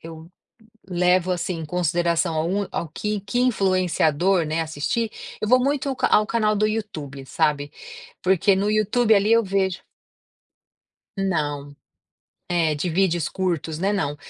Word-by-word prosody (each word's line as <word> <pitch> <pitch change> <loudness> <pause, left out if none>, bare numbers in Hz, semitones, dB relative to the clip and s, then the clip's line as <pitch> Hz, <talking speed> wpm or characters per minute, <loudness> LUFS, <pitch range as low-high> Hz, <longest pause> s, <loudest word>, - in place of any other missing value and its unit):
eu 165 0 -11 0.6
levo, 180 0 +2
assim, 180 0 -2
em 160 - -5
consideração 170 0 0
a 155 - +1
um 195 +3 -1
ao 170 - -3
que 210 +6 -3
que 205 +5 -2
influenciador, 185 - +2
né, 155 +2 -2
assistir, 160 +9 -2 0.3
eu 215 - -2
vou 255 +3 +6
muito 275 0 0
ca 255 - +1
ao 210 - +4
canal 215 -2 +1
do 215 +1 +2
YouTube, 155 -11 -5
sabe. 145 +1 0 0.5
Porque 190 +2 +3
no 200 +2 0
YouTube, 215 +2 +3
ali, 205 +2 +2
eu 230 0 +6
vejo 190 -2 -1 1.4
Não. 145 -7 -2 0.8
É, 165 -3 +2
de 165 +4 -2
vídeos 175 -2 +1
curtos, 170 -4 -2
né, 195 +4 0
não. 145 -8 -1
185 Hz, 145 wpm, -23 LUFS, 160-205 Hz, 1.4 s, vou